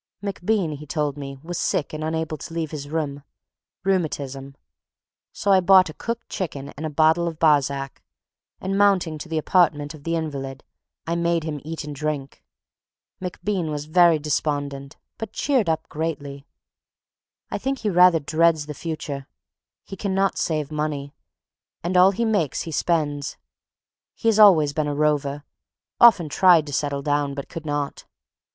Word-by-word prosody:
MacBean, 200 -2 -1
he 150 +1 -11
told 150 -2 -1
me, 140 -1 -7
was 175 +1 -4
sick 145 - -1
and 155 0 -4
unable 160 0 -2
to 160 +2 -9
leave 160 -3 -2
his 145 -2 -6
room. 145 -3 -3 0.6
Rheumatism. 140 -8 -2 0.8
So 200 - -1
I 190 - +7
bought 185 -2 +5
a - - -14
cooked 230 +8 -5
chicken 145 -7 -5
and 155 +3 -5
a - - -4
bottle 160 +3 +3
of 165 -2 -4
Barsac, 140 -3 +1 0.6
and 195 +1 -2
mounting 185 -6 +3
to - - -8
the 160 - -1
apartment 150 -3 +2
of 150 -2 -13
the 165 +1 -1
invalid, 140 -4 -4 0.4
I 165 - -1
made 170 -1 +1
him 150 -3 -4
eat 160 +1 -5
and 145 0 -7
drink. 145 -2 -4 0.8
MacBean 180 -1 -2
was 150 -1 -4
very 170 +1 +5
despondent, 145 -2 -2 0.2
but 225 -2 -6
cheered 260 - +1
up 160 0 -1
greatly. 145 -3 -5 1.0
I - - -2
think 270 +1 -1
he 215 - 0
rather 180 -1 +6
dreads 160 +1 +2
the 150 - -6
future. 145 -3 -5 0.6
He - - -8
cannot 195 0 0
save 155 -2 -1
money, 150 -2 -3 0.7
and 175 +2 -2
all 180 +1 +7
he 220 +4 -1
makes 200 - 0
he 165 - -7
spends. 145 -3 -1 0.8
He 230 - +1
has 220 -1 +2
always 160 -9 +7
been 155 -1 -1
a 145 - -2
rover, 145 -1 0 0.6
often 205 -9 +7
tried 170 +1 +5
to 145 - -7
settle 140 0 -1
down 145 -1 0
but 140 - -6
could 160 -2 -7
not. 145 -1 -3
155 Hz, 160 wpm, -23 LUFS, 145-175 Hz, 1.0 s, I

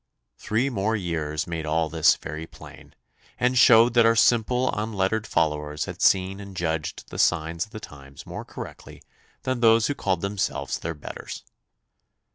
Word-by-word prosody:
Three 120 +6 0
more 110 -1 0
years 80 -5 -2
made 85 -3 -5
all 80 +1 +1
this 80 -1 +4
very 80 0 -7
plain, - - -14 0.4
and 125 +1 +2
showed 120 -1 +6
that 120 -1 +5
our 115 - +4
simple 125 +3 +3
unlettered 105 0 -1
followers 75 -3 -1
had - - -8
seen 95 +1 +3
and 100 -2 -10
judged 80 -3 -3
the - - -6
signs 85 0 +1
of - - -27
the 110 - -7
times 70 -6 -12
more - - -7
correctly - - -10 0.4
than 130 -1 -1
those 115 -1 +5
who 145 - 0
called 95 -9 -1
themselves 100 -1 -2
their 85 0 -4
betters. 75 - -8
95 Hz, 160 wpm, -25 LUFS, 80-110 Hz, 0.4 s, showed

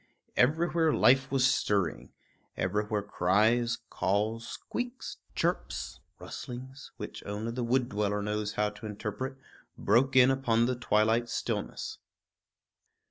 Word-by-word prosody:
Everywhere 160 +4 +3
life 135 -1 +4
was 135 -2 +3
stirring; 105 -9 +1 0.5
everywhere 105 +2 0
cries, 110 +5 +2
calls, 110 +4 0
squeaks, 245 +1 -5 0.2
chirps, - - -2 0.2
rustlings, 130 +2 -8
which - - -7
only 105 +3 -3
the 125 +1 -3
wood 125 +1 +2
dweller 105 0 -1
knows 105 0 -2
how 105 0 0
to 105 +1 -9
interpret, 105 +6 -4 0.4
broke 130 +2 +3
in 130 0 +7
upon 120 -4 +2
the 125 +1 0
twilight 115 0 +2
stillness. - - -3
115 Hz, 115 wpm, -30 LUFS, 105-130 Hz, 0.5 s, in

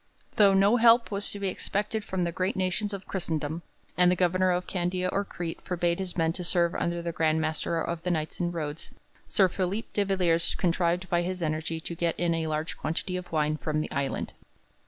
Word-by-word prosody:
Though 200 -2 +6
no 200 +5 +5
help 230 0 +5
was 200 0 0
to 205 - -2
be 200 - -1
expected 210 +3 -2
from 190 -3 -2
the 170 - 0
great 185 +3 -1
nations 190 +3 -1
of 200 -1 -6
Christendom, 160 -3 -2 0.3
and 180 0 +5
the - - +3
Governor 185 +1 +2
of 180 0 +1
Candia 180 0 -1
or 200 - 0
Crete 175 -4 -6
forbade 175 -1 0
his 185 -2 -4
men 165 -1 +2
to 180 - -5
serve 170 -1 +2
under 170 0 -1
the 170 - -2
Grand 160 -1 +1
Master 160 +1 -1
of 165 +1 -3
the 180 - -2
Knights 155 -3 -2
in 175 -1 0
Rhodes, 155 -2 -5 0.4
Sir 190 - +4
Philip 190 +4 -3
de 205 - +2
Villiers 180 -4 +2
contrived 175 +1 +1
by 175 0 +2
his 180 0 -3
energy 160 +1 -2
to 170 - -5
get 170 0 -1
in 175 -1 +2
a 165 -1 -1
large 155 +1 -2
quantity 180 +3 -2
of 180 0 -6
wine 155 -1 +1
from 155 0 -1
the 155 - -3
island. 140 0 -2
175 Hz, 215 wpm, -28 LUFS, 165-185 Hz, 0.4 s, Though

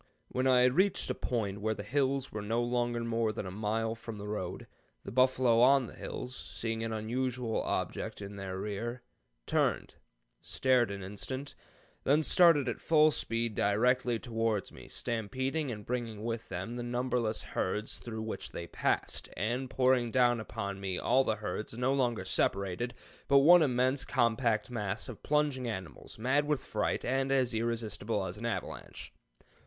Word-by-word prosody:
When 130 +1 0
I 125 -1 +5
had 125 0 +5
reached 190 +5 +2
a - - +1
point 105 -5 -2
where 110 +1 0
the - - -6
hills 135 0 0
were 105 - -4
no 115 +3 0
longer 120 -1 0
more 115 -1 0
than 105 - -5
a 95 - -5
mile 110 +3 -1
from 115 -1 -8
the 105 0 -7
road, 105 -4 -4 0.4
the - - -7
buffalo 130 -2 +4
on 130 +2 +6
the - - -10
hills, 125 +1 -6
seeing 115 -3 -4
an 115 - -2
unusual 120 +2 -1
object - - -3
in 100 0 -7
their 95 -1 -5
rear, 105 +5 -4 0.4
turned, - - 0 0.5
stared 130 -4 +2
an 100 -1 -5
instant, 130 +8 -5 0.5
then 150 +3 +3
started 165 -5 +5
at 120 - -3
full 155 -1 +5
speed 115 -4 -1
directly 120 +4 +2
towards 115 -3 -1
me, - - -12
stampeding 130 +6 -2
and 105 -4 -6
bringing 115 -4 -3
with 115 0 -3
them 95 +7 -4
the - - -3
numberless 120 -2 -1
herds 105 +4 -2
through 110 -2 -5
which 110 - -5
they 85 - -5
passed, 85 - -1
and 120 +8 -1
pouring 130 -2 +3
down 120 -1 +3
upon 100 -3 -5
me 95 -2 -2
all 135 - +3
the 110 - 0
herds, 105 +2 -5
no 125 +2 +2
longer 120 -7 0
separated, 100 +5 0 0.3
but 140 - +6
one 170 +6 +8
immense 130 -1 +2
compact 115 -2 +1
mass 105 -3 -3
of 120 - -8
plunging 145 -4 +1
animals, 95 -7 -6
mad 130 +6 +2
with 150 -3 0
fright, 105 -1 -1
and 135 +1 +1
as 130 -3 +2
irresistible 110 -2 -1
as 90 0 -5
an 115 - -2
avalanche. 115 - -5
115 Hz, 170 wpm, -31 LUFS, 110-130 Hz, 0.5 s, one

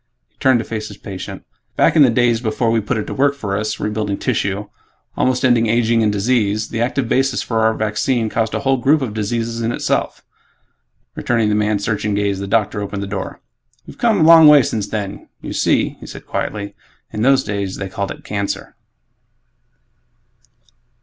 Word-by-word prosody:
He - - -43
turned 130 -2 +4
to 115 - -3
face 110 -2 -5
his - - -11
patient, 95 -3 -8 0.3
"Back - - +3
in 155 - +6
the 135 - +7
days 120 -1 +2
before 115 0 0
we 115 -1 +2
put 105 - -2
it 110 - -3
to - - -5
work 140 +1 +2
for 100 -8 -3
us 105 +1 -2
rebuilding 105 -1 -2
tissue, 100 +1 -1 0.5
almost 130 0 +1
ending 120 -2 +3
aging 115 0 +2
and 105 -1 +2
disease 105 0 0
the 115 - -3
active 125 +1 -1
basis 135 +1 +1
for 115 -2 -1
our 110 0 +2
vaccine 110 +2 0
caused 110 0 -1
a - - -2
whole 135 -1 +2
group 140 +3 +2
of 115 -5 -4
diseases, 115 +2 -2
in 115 +1 0
itself." - - -2 0.9
Returning 115 -3 0
the - - +1
man's 105 -1 0
searching 105 -1 -1
gaze, 100 -1 0
the 100 - -5
doctor 105 0 0
opened 100 0 -4
the - - -3
door, 95 0 -6 0.4
"We've - - -12
come 225 -6 +2
a - - +5
long 165 -1 +8
way 150 -3 +8
since 105 -3 -2
then. 100 -2 -5
You - - -7
see," - - +1
he - - -11
said - - -10
quietly, 100 -1 -4 0.4
"in 105 - -3
those 135 +2 +4
days 100 -2 -3
they 95 - -5
called 100 +1 -4
it - - -8
'cancer'." 100 -1 -4
110 Hz, 195 wpm, -18 LUFS, 105-120 Hz, 0.9 s, long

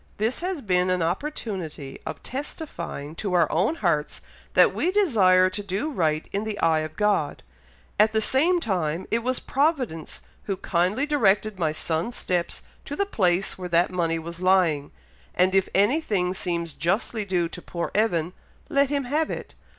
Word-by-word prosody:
This 220 +4 0
has 360 -3 -3
been 180 -2 +2
an 180 -2 +1
opportunity 175 - -4
of - - -6
testifying 270 - -6
to 200 -4 -3
our 170 -2 +5
own 190 - +1
hearts 165 - 0 0.4
that - - +6
we 355 - 0
desire 210 - +4
to 205 - -4
do 200 +10 -2
right 155 - 0
in 200 +1 -1
the 215 -1 -4
eye 160 -1 +3
of 155 0 -5
God. 210 -1 0 0.6
At 215 +1 +5
the 220 - +2
same 310 +11 +3
time, 180 - -1
it 230 - +3
was 255 +2 0
Providence 265 - -1 0.2
who 195 -2 -2
kindly 185 +9 0
directed 215 -8 +2
my 160 -3 +1
son's 160 +8 -2
steps 175 -2 -2 0.2
to 290 - -5
the 400 - +1
place 190 - +1
where 180 -1 -5
that 170 +1 +3
money 165 -2 0
was 170 +1 -7
lying; 180 -6 +3 0.5
and 185 +1 +3
if 195 -1 +3
anything 205 - +2
seems 170 -3 -2
justly 210 +5 -1
due 180 -4 0
to 175 - -9
poor 170 -1 -4
Evan, 180 -6 +1 0.4
let 280 -3 +3
him 285 -1 0
have 300 +5 0
it. - - -6
190 Hz, 170 wpm, -25 LUFS, 170-245 Hz, 0.6 s, that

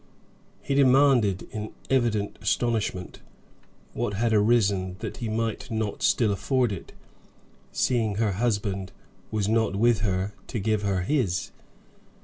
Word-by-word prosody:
He - - -1
demanded, 130 -7 +4
in 110 0 -5 0.2
evident 115 -6 +1
astonishment, 110 -6 -1 0.7
what 100 - -2
had 115 +2 +1
arisen 100 -4 +2
that - - -6
he 115 -3 -4
might 115 0 -2
not 110 -2 -2
still 110 -4 +3
afford 125 +3 +1
it, 95 - -7 0.8
seeing 115 -5 +1
her 110 0 +1
husband 100 -3 -1 0.4
was 105 -2 -1
not 110 -2 +1
with 115 +1 +3
her 100 -1 -1
to 120 - -4
give 110 +1 0
her 100 -3 0
his. 95 - 0
110 Hz, 130 wpm, -26 LUFS, 100-120 Hz, 0.8 s, demanded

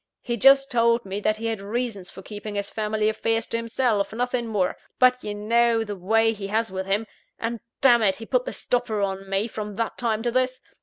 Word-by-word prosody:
He 240 - -1
just 275 +3 +5
told 235 -1 +3
me 195 +1 -4
that 215 +1 +1
he 225 - -6
had 225 -3 -2
reasons 205 -2 -3
for 190 - -11
keeping 210 0 -7
his 200 0 -3
family 215 0 0
affairs 225 +1 0
to 230 - -1
himself 230 -2 0
nothing 245 +1 -1
more 200 -5 0 0.2
but 250 0 +4
you 205 0 -4
know 230 +2 +2
the 210 -2 -5
way 225 +4 +2
he 200 -2 -6
has 220 0 0
with 190 0 -4
him; 205 +3 0 0.3
and, 230 0 -3 0.2
damn 240 -3 +6
it, 195 -3 +3
he 225 - -9
put - - +1
the - - -3
stopper 240 -4 -1
on 195 0 -3
me, 195 +3 0
from 210 -2 -6
that 230 +1 -3
time 225 -2 0
to 240 - 0
this. 255 +1 0
225 Hz, 220 wpm, -24 LUFS, 205-235 Hz, 0.3 s, damn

